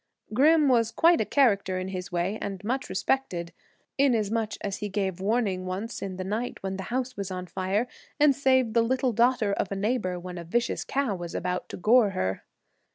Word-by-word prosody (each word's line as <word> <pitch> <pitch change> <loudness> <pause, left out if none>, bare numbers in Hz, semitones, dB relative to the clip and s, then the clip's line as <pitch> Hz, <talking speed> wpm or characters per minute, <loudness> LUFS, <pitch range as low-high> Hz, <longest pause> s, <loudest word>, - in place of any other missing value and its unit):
Grim 300 +5 +5
was 235 -4 +3
quite 335 +7 +4
a - - 0
character 200 -9 +2
in 185 +1 -3
his 185 -1 -5
way 180 +5 -1
and 195 -1 -5
much 255 +5 -2
respected, 185 -4 -1 0.5
inasmuch 225 -5 +2
as 200 -1 -3
he 210 -1 -4
gave 190 -2 -2
warning 200 -3 0
once 200 +6 -4
in 190 -1 -4
the 185 - -3
night 215 +6 -3
when 190 0 -3
the 190 - -5
house 255 +1 -2
was 200 -1 -4
on 185 -1 -5
fire, 190 +6 -1 0.3
and 290 -2 +5
saved 260 -4 +2
the 230 - +4
little 255 +1 +1
daughter 235 -2 +2
of 200 - -2
a - - -1
neighbor 195 -3 -1
when 180 0 -7
a - - -6
vicious 235 +9 -1
cow 275 -6 -1
was 175 -2 -6
about 180 0 -2
to - - -6
gore 220 +3 +5
her. 95 - -2
205 Hz, 200 wpm, -27 LUFS, 185-245 Hz, 0.5 s, Grim